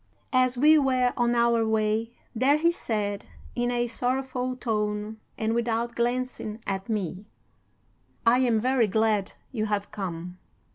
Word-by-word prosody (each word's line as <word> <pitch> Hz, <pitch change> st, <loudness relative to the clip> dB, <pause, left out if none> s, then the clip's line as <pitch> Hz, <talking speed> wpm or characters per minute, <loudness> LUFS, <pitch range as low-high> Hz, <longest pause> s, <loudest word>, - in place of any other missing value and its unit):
As 255 Hz, -1 st, +3 dB
we 305 Hz, +4 st, +6 dB
were 255 Hz, -3 st, +2 dB
on 240 Hz, 0 st, +1 dB
our 235 Hz, -1 st, +3 dB
way 220 Hz, 0 st, +1 dB, 0.2 s
there 260 Hz, +5 st, +3 dB
he 335 Hz, +2 st, +3 dB
said, 210 Hz, -, -3 dB, 0.3 s
in 240 Hz, 0 st, 0 dB
a 240 Hz, 0 st, +1 dB
sorrowful 255 Hz, +1 st, -2 dB
tone 210 Hz, -2 st, -2 dB, 0.2 s
and 220 Hz, -2 st, 0 dB
without 235 Hz, 0 st, -1 dB
glancing 240 Hz, -2 st, -2 dB
at 195 Hz, +1 st, -3 dB
me: 200 Hz, -2 st, -3 dB, 1.0 s
"'I 235 Hz, +2 st, +5 dB
am 240 Hz, -4 st, +3 dB
very 250 Hz, -1 st, +2 dB
glad 215 Hz, -1 st, +1 dB, 0.2 s
you 215 Hz, -4 st, -1 dB
have 205 Hz, -1 st, -2 dB
come. 180 Hz, -2 st, -6 dB
230 Hz, 140 wpm, -26 LUFS, 210-250 Hz, 1.0 s, we